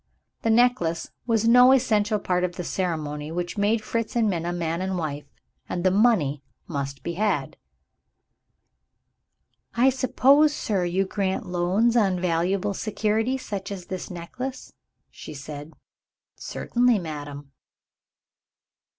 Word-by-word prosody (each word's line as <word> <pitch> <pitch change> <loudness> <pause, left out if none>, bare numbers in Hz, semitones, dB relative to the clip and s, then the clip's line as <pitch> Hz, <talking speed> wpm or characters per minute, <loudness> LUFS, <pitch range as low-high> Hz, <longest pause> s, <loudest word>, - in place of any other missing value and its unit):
The 225 - 0
necklace 225 -8 +2 0.2
was 225 -1 +2
no 250 +2 +7
essential 215 -5 +2
part 180 -3 -1
of 180 -1 -2
the 180 - -4
ceremony 155 -5 -3
which 175 +1 -3
made 215 +2 +1
Fritz 230 +1 -3
and 230 -2 +3
Minna 175 -3 -1
man 170 0 -2
and 190 0 -2
wife 145 -3 -4 0.4
and 175 - -3
the 185 - +4
money 190 - +2 0.3
must 140 -3 -4
be 170 - -3
had. 210 +4 -1 2.2
"I 255 +3 +5
suppose, 275 +3 +4
sir, 195 -4 -1
you 185 +3 0
grant 190 -1 -2
loans 180 +7 +1
on 195 -6 +2
valuable 185 +3 0
security 220 +4 0
such 200 -6 -6
as 185 -3 -6
this 185 -1 -6
necklace?" 250 +10 -7 0.4
she 155 - -10
said. 145 +2 -8 0.6
"Certainly, 245 -1 +1
madam." 145 -5 -7
190 Hz, 125 wpm, -25 LUFS, 170-225 Hz, 2.2 s, no